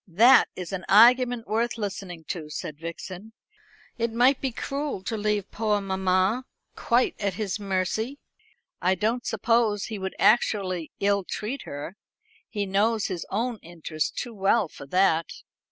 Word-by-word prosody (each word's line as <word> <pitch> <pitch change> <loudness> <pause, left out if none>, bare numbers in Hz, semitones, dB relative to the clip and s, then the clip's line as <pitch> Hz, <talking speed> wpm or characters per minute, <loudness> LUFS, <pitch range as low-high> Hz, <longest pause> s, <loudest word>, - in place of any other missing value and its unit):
"That 230 +9 +6
is 180 0 -6
an 185 -1 -3
argument 245 +2 +6
worth 235 +2 0
listening 195 -5 -5
to," 160 -4 -4
said 150 0 -6
Vixen. 180 +5 -8 0.7
"It 230 0 0
might 250 +4 +3
be 265 - -1
cruel 275 -3 -4
to 225 - -3
leave 210 -2 -1
poor 210 -2 0
mamma 190 +4 +1 0.3
quite 240 +2 +2
at 200 -2 -1
his 200 -1 -3
mercy. 200 +6 -1 0.6
I 185 +1 +3
don't 225 +6 -1
suppose 220 -1 +1
he 215 -3 -5
would 190 0 -4
actually 190 -7 +2
ill 200 0 +2
treat 230 +8 -5
her. 145 +7 -7 0.5
He 205 -2 -2
knows 210 +3 +1
his 180 -3 -4
own 230 +3 -1
interest 165 -2 -4
too 240 - -4
well 200 0 +2
for 140 - -12
that. 165 -1 +3
205 Hz, 150 wpm, -26 LUFS, 185-230 Hz, 0.7 s, That